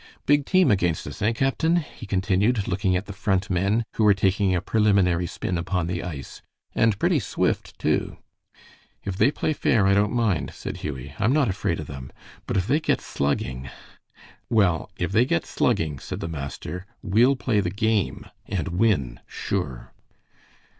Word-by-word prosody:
Big 145 Hz, 0 st, +3 dB
team 185 Hz, -8 st, +4 dB
against 90 Hz, -5 st, +1 dB
us, -, -, -8 dB
eh, 105 Hz, +3 st, +3 dB
captain?" 135 Hz, +7 st, +1 dB
he 145 Hz, -9 st, -4 dB
continued, 100 Hz, +3 st, +1 dB
looking 95 Hz, 0 st, +1 dB
at 90 Hz, +3 st, -1 dB
the 100 Hz, -, -7 dB
Front 95 Hz, 0 st, 0 dB
men, 100 Hz, +5 st, +2 dB
who 110 Hz, -, 0 dB
were 105 Hz, -2 st, +6 dB
taking 95 Hz, 0 st, +2 dB
a -, -, +2 dB
preliminary 95 Hz, -4 st, +2 dB
spin 90 Hz, +1 st, -3 dB
upon 90 Hz, 0 st, -1 dB
the 85 Hz, 0 st, -2 dB
ice, 75 Hz, -8 st, -7 dB, 0.3 s
"and 110 Hz, -3 st, +2 dB
pretty -, -, +2 dB
swift, -, -, -1 dB
too." -, -, 0 dB, 0.9 s
"If 95 Hz, -, -3 dB
they 115 Hz, -, +4 dB
play 155 Hz, +1 st, -1 dB
fair, 115 Hz, -7 st, +2 dB
I 100 Hz, -, +4 dB
don't 100 Hz, +1 st, +3 dB
mind," 100 Hz, -, 0 dB
said -, -, -6 dB
Hughie. 65 Hz, -1 st, -6 dB
"I'm 110 Hz, +5 st, +3 dB
not 145 Hz, -6 st, +3 dB
afraid 95 Hz, -3 st, -1 dB
of 75 Hz, -, -5 dB
them; 65 Hz, -2 st, -8 dB, 0.4 s
but -, -, 0 dB
if 95 Hz, -, +1 dB
they 140 Hz, +8 st, +2 dB
get -, -, +1 dB
slugging 65 Hz, -2 st, -2 dB, 0.4 s
" -, -, -36 dB, 0.3 s
"Well, 100 Hz, -8 st, +2 dB
if -, -, -2 dB
they 115 Hz, -, +4 dB
get 85 Hz, -9 st, 0 dB
slugging," 75 Hz, -4 st, 0 dB
said -, -, -6 dB
the -, -, -4 dB
master, 80 Hz, +4 st, -6 dB, 0.2 s
"we'll 115 Hz, +7 st, +4 dB
play 120 Hz, -4 st, 0 dB
the 90 Hz, -3 st, 0 dB
game 105 Hz, +1 st, 0 dB, 0.2 s
and -, -, -2 dB
win, 90 Hz, -, +1 dB
sure." 75 Hz, -11 st, -4 dB
95 Hz, 175 wpm, -24 LUFS, 85-110 Hz, 0.9 s, were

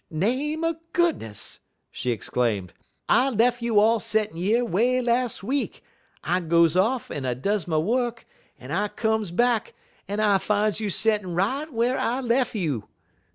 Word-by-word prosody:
"Name 260 Hz, -, -1 dB
er 330 Hz, -1 st, 0 dB, 0.2 s
goodness!" 320 Hz, -, -1 dB, 0.3 s
she 125 Hz, -, -4 dB
exclaimed, 110 Hz, -4 st, -1 dB, 0.3 s
"I 260 Hz, +2 st, +4 dB
lef' 240 Hz, 0 st, +2 dB
you 230 Hz, -3 st, +3 dB
all 225 Hz, +2 st, +4 dB
settin' 215 Hz, -3 st, -1 dB
yer 215 Hz, +8 st, +2 dB
way 240 Hz, +5 st, +2 dB
las' 245 Hz, -3 st, 0 dB
week; 270 Hz, +7 st, -2 dB, 0.4 s
I 180 Hz, -, +1 dB
goes 170 Hz, -1 st, +3 dB
off 225 Hz, +7 st, +1 dB
un 140 Hz, -, -4 dB
I 125 Hz, -2 st, -1 dB
does 200 Hz, +7 st, -1 dB
my 160 Hz, -2 st, 0 dB
wuk, 235 Hz, +7 st, 0 dB, 0.3 s
un 125 Hz, +2 st, -10 dB
I 200 Hz, +5 st, +1 dB
comes 220 Hz, -2 st, -1 dB
back, 235 Hz, +5 st, +1 dB, 0.3 s
un 205 Hz, +1 st, -2 dB
I 205 Hz, -2 st, +3 dB
fines 210 Hz, +1 st, 0 dB
you 215 Hz, -2 st, -2 dB
settin' 205 Hz, -3 st, 0 dB
right 265 Hz, -, -1 dB
whar 240 Hz, +2 st, +1 dB
I 245 Hz, +3 st, 0 dB
lef' 245 Hz, -1 st, 0 dB
you. 145 Hz, -, -2 dB
215 Hz, 160 wpm, -25 LUFS, 175-245 Hz, 0.4 s, I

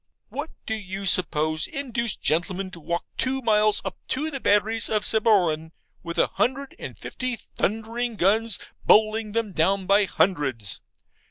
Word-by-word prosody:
What 290 Hz, +4 st, -5 dB, 0.2 s
do 220 Hz, -, -2 dB
you 195 Hz, -2 st, -5 dB
suppose 155 Hz, -4 st, +3 dB
induced 235 Hz, -5 st, -2 dB
gentlemen 185 Hz, +4 st, 0 dB
to 175 Hz, -, -10 dB
walk 170 Hz, +2 st, -3 dB
two 260 Hz, +1 st, 0 dB
miles 215 Hz, -2 st, +3 dB
up 190 Hz, -, -5 dB
to 305 Hz, +4 st, -2 dB
the 275 Hz, -, -4 dB
batteries 215 Hz, 0 st, +2 dB
of 215 Hz, -1 st, 0 dB
Sabroan, 175 Hz, -8 st, +2 dB, 0.3 s
with 170 Hz, 0 st, -6 dB
a -, -, +5 dB
hundred 270 Hz, +2 st, -2 dB
and -, -, -8 dB
fifty 255 Hz, -1 st, -4 dB
thundering 225 Hz, +2 st, -3 dB
guns 215 Hz, +3 st, +2 dB, 0.3 s
bowling 215 Hz, 0 st, +3 dB
them 225 Hz, -2 st, -1 dB
down 190 Hz, +4 st, +1 dB
by 200 Hz, +2 st, +4 dB
hundreds? 135 Hz, -, 0 dB
210 Hz, 150 wpm, -24 LUFS, 180-230 Hz, 0.3 s, a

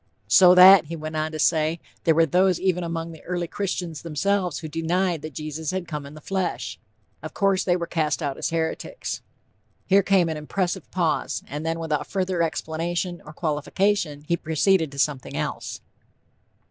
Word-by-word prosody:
'So 180 Hz, -1 st, +7 dB
that,' 185 Hz, -1 st, +9 dB
he 165 Hz, +3 st, -6 dB
went 155 Hz, 0 st, -6 dB
on 155 Hz, 0 st, -1 dB
to 155 Hz, -, -5 dB
say, 160 Hz, +1 st, +2 dB, 0.3 s
'there 160 Hz, -, +4 dB
were 165 Hz, +1 st, +5 dB
those 180 Hz, +3 st, +2 dB
even 180 Hz, -2 st, 0 dB
among 165 Hz, 0 st, -4 dB
the 160 Hz, -, -12 dB
early 175 Hz, -1 st, -3 dB
Christians 180 Hz, -4 st, -3 dB
themselves 180 Hz, +2 st, 0 dB
who 160 Hz, -, -6 dB
denied 170 Hz, +2 st, 0 dB
that 155 Hz, -3 st, -8 dB
Jesus 155 Hz, 0 st, -4 dB
had 185 Hz, -1 st, -3 dB
come 150 Hz, -3 st, -5 dB
in 145 Hz, -, -12 dB
the -, -, -10 dB
flesh. 190 Hz, +1 st, -3 dB, 0.4 s
Of -, -, -8 dB
course, 195 Hz, -2 st, +2 dB
they 175 Hz, -, +2 dB
were 170 Hz, -1 st, -2 dB
cast 160 Hz, -2 st, -1 dB
out 140 Hz, -2 st, -2 dB
as -, -, -2 dB
heretics.' 165 Hz, -, -3 dB, 0.6 s
Here 195 Hz, +1 st, +5 dB
came 190 Hz, -3 st, +3 dB
an 160 Hz, -1 st, -3 dB
impressive 180 Hz, +3 st, -3 dB
pause, 165 Hz, -4 st, -1 dB
and 145 Hz, +2 st, -6 dB
then 165 Hz, 0 st, -1 dB
without 160 Hz, -3 st, -2 dB
further 185 Hz, -2 st, -1 dB
explanation 170 Hz, +2 st, -2 dB
or -, -, -8 dB
qualification, 155 Hz, +1 st, 0 dB
he 170 Hz, -, +2 dB
proceeded 160 Hz, 0 st, +1 dB
to 140 Hz, -, -11 dB
something 140 Hz, -2 st, -1 dB
else." -, -, -4 dB
165 Hz, 180 wpm, -24 LUFS, 155-185 Hz, 0.6 s, that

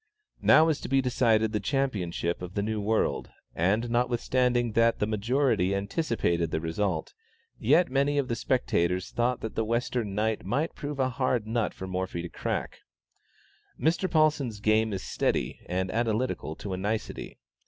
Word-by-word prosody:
Now 155 Hz, -, +7 dB
was 160 Hz, -3 st, 0 dB
to -, -, -6 dB
be 135 Hz, 0 st, +3 dB
decided 115 Hz, -4 st, +2 dB
the 105 Hz, -, 0 dB
championship 100 Hz, -, -1 dB
of 90 Hz, +1 st, -7 dB
the 100 Hz, -, 0 dB
New 110 Hz, 0 st, -2 dB
World, 110 Hz, +2 st, 0 dB, 0.2 s
and 105 Hz, +8 st, +1 dB
notwithstanding 120 Hz, 0 st, +1 dB
that 115 Hz, +1 st, +3 dB
the -, -, 0 dB
majority 110 Hz, -2 st, +1 dB
anticipated 100 Hz, -, 0 dB
the 80 Hz, -, -1 dB
result, 80 Hz, +1 st, -2 dB, 0.5 s
yet 150 Hz, +5 st, +3 dB
many 140 Hz, +2 st, +2 dB
of 140 Hz, -2 st, +1 dB
the 115 Hz, -, -1 dB
spectators 90 Hz, -9 st, 0 dB
thought 120 Hz, +1 st, 0 dB
that 110 Hz, -, -4 dB
the 110 Hz, -, 0 dB
Western 115 Hz, -2 st, -1 dB
knight 110 Hz, +1 st, 0 dB
might 140 Hz, -, -1 dB
prove 145 Hz, 0 st, -5 dB
a 130 Hz, -1 st, +2 dB
hard 125 Hz, -3 st, 0 dB
nut 115 Hz, 0 st, 0 dB
for 95 Hz, -, -6 dB
Morphy 95 Hz, -2 st, -3 dB
to 85 Hz, -, -5 dB
crack. -, -, -3 dB, 1.0 s
Mr. 175 Hz, +4 st, +1 dB
Paulsen's 150 Hz, -9 st, +2 dB
game 110 Hz, +1 st, +2 dB
is 95 Hz, -2 st, -4 dB
steady -, -, -1 dB
and 95 Hz, +1 st, -1 dB
analytical 115 Hz, -6 st, -1 dB
to 100 Hz, +2 st, -6 dB
a -, -, -2 dB
nicety. 105 Hz, +4 st, -3 dB
110 Hz, 165 wpm, -28 LUFS, 100-130 Hz, 1.0 s, Now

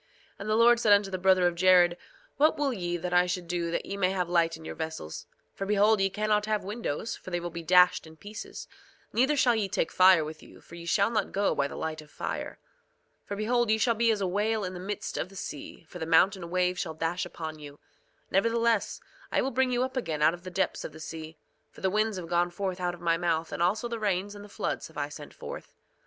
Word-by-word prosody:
2:23 -, -, -36 dB, 0.3 s
And 200 Hz, +2 st, -5 dB
the 215 Hz, -, +3 dB
Lord 235 Hz, +1 st, +6 dB
said 215 Hz, -3 st, +5 dB
unto 200 Hz, -1 st, +3 dB
the 185 Hz, -, -3 dB
brother 185 Hz, -1 st, +4 dB
of 175 Hz, -, +3 dB
Jared: 175 Hz, 0 st, +5 dB, 0.4 s
What 305 Hz, +3 st, +4 dB
will 285 Hz, -2 st, 0 dB
ye 175 Hz, -4 st, -2 dB
that 180 Hz, +1 st, -4 dB
I 180 Hz, 0 st, +4 dB
should 180 Hz, -1 st, -3 dB
do 170 Hz, -1 st, -1 dB
that 170 Hz, -, -2 dB
ye 200 Hz, -, -5 dB
may 185 Hz, -2 st, +2 dB
have 185 Hz, -2 st, -1 dB
light 170 Hz, -2 st, +2 dB
in 160 Hz, -, -13 dB
your -, -, -5 dB
vessels? 160 Hz, -, -6 dB, 0.3 s
For 195 Hz, -, -5 dB
behold, 210 Hz, +1 st, +4 dB
ye 195 Hz, -, +3 dB
cannot 210 Hz, +1 st, 0 dB
have 215 Hz, -1 st, 0 dB
windows, 210 Hz, -1 st, -3 dB
for -, -, -10 dB
they 175 Hz, -1 st, -1 dB
will 175 Hz, 0 st, -5 dB
be 170 Hz, 0 st, -6 dB
dashed 180 Hz, 0 st, +4 dB
in 160 Hz, 0 st, -14 dB
pieces; 210 Hz, +5 st, -8 dB, 0.5 s
neither 265 Hz, +6 st, +3 dB
shall 250 Hz, -3 st, +4 dB
ye 215 Hz, -3 st, -1 dB
take 165 Hz, -, -1 dB
fire 185 Hz, -4 st, +6 dB
with 155 Hz, +1 st, -8 dB
you, -, -, -15 dB
for -, -, -18 dB
ye 170 Hz, 0 st, -9 dB
shall 200 Hz, +5 st, +2 dB
not 220 Hz, -, 0 dB
go 200 Hz, 0 st, +1 dB
by 140 Hz, -, 0 dB
the -, -, -9 dB
light 155 Hz, -1 st, -4 dB
of 150 Hz, -, -16 dB
fire. -, -, -5 dB, 0.7 s
2:24 -, -, -43 dB
For 200 Hz, -, -4 dB
behold, 235 Hz, +2 st, +1 dB
ye 220 Hz, -, +4 dB
shall 230 Hz, +2 st, +2 dB
be 230 Hz, +1 st, +2 dB
as 215 Hz, -2 st, +1 dB
a 190 Hz, -, +1 dB
whale 210 Hz, +3 st, 0 dB
in 185 Hz, -1 st, -4 dB
the 180 Hz, -, -7 dB
midst 200 Hz, +2 st, -4 dB
of -, -, -3 dB
the 195 Hz, -, -15 dB
sea; 160 Hz, -2 st, -7 dB
for 175 Hz, -, -10 dB
the 160 Hz, -, -4 dB
mountain 175 Hz, +2 st, +3 dB
waves 180 Hz, 0 st, +1 dB
shall 160 Hz, -4 st, -5 dB
dash 165 Hz, +3 st, -1 dB
upon 155 Hz, -1 st, -6 dB
you. 145 Hz, -1 st, -10 dB, 0.5 s
Nevertheless, 230 Hz, +1 st, +1 dB, 0.3 s
I -, -, +2 dB
will 270 Hz, -, -1 dB
bring 260 Hz, +1 st, +1 dB
you 245 Hz, 0 st, +1 dB
up 260 Hz, +1 st, -4 dB
again 160 Hz, -12 st, -1 dB
out 155 Hz, -, +5 dB
of 175 Hz, -, -8 dB
the 185 Hz, -, -6 dB
depths 185 Hz, +1 st, -1 dB
of 155 Hz, -, -7 dB
the 155 Hz, -, -11 dB
sea; 160 Hz, 0 st, -8 dB, 0.3 s
for -, -, -16 dB
the 190 Hz, -, +1 dB
winds 215 Hz, 0 st, +1 dB
have 175 Hz, -2 st, -6 dB
gone 175 Hz, +1 st, +1 dB
forth 185 Hz, +1 st, -3 dB
out 175 Hz, -1 st, -1 dB
of -, -, -17 dB
my 165 Hz, -1 st, +2 dB
mouth, 165 Hz, -1 st, -1 dB
and -, -, -4 dB
also 200 Hz, +7 st, +1 dB
the 235 Hz, -1 st, -4 dB
rains 205 Hz, -1 st, -1 dB
and 205 Hz, 0 st, -10 dB
the 205 Hz, -, -12 dB
floods -, -, -3 dB
have -, -, -16 dB
I -, -, -2 dB
sent -, -, -10 dB
forth. 485 Hz, 0 st, -9 dB
185 Hz, 260 wpm, -28 LUFS, 170-215 Hz, 0.7 s, Lord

